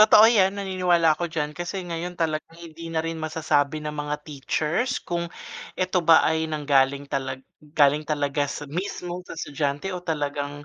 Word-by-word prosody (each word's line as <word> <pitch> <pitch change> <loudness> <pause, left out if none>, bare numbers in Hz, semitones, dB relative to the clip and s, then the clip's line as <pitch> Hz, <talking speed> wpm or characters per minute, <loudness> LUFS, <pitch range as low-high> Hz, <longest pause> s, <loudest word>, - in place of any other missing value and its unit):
Totoo 215 0 +9
'yan, 200 -4 +4
naniniwala 180 -4 +3
ako 175 - -2
diyan, 150 -2 -2
kasi 175 +3 -3
ngayon 175 +1 -4
talaga 155 -2 0
hindi 165 0 -9
na 160 - +1
rin 165 0 -3
masasabi 155 -2 0
ng 150 0 -4
mga 150 0 -2
teachers 155 - -1
kung 170 0 -3 0.5
eto 185 0 +1
ba 165 0 +8
ay 160 0 +2
nanggaling 140 -2 +2
talag 135 -1 -3 0.2
galing 150 0 +2
talaga 145 -1 0
sa 145 - -5
mismo 180 +2 -4
sa - - -10
estudyante 145 +4 -2
o 180 - -4
talagang 145 -2 -3
160 Hz, 165 wpm, -25 LUFS, 145-175 Hz, 0.5 s, Totoo